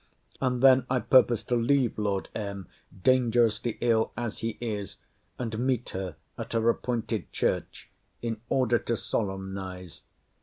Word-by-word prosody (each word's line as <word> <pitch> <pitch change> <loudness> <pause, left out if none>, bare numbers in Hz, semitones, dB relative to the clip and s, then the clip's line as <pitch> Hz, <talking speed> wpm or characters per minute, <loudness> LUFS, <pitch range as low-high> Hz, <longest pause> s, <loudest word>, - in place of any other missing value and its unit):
And 125 -1 0
then 130 -1 +6
I 130 - +2
purpose 120 -2 +4
to 120 - 0
leave 120 0 +2
Lord 100 -2 -1
M. 100 -3 -5 0.4
(dangerously 120 -3 +3
ill 115 -2 +2
as 120 -2 -3
he 115 0 -3
is,) 105 -4 -4 0.4
and 115 -3 -3
meet 125 0 0
her 95 -3 -4 0.2
at - - -5
her 115 0 +1
appointed 115 -4 -3
church, - - -2 0.3
in 115 -2 -4
order 120 -3 +3
to 115 - -2
solemnize. 95 -4 -4
115 Hz, 140 wpm, -28 LUFS, 100-125 Hz, 0.4 s, then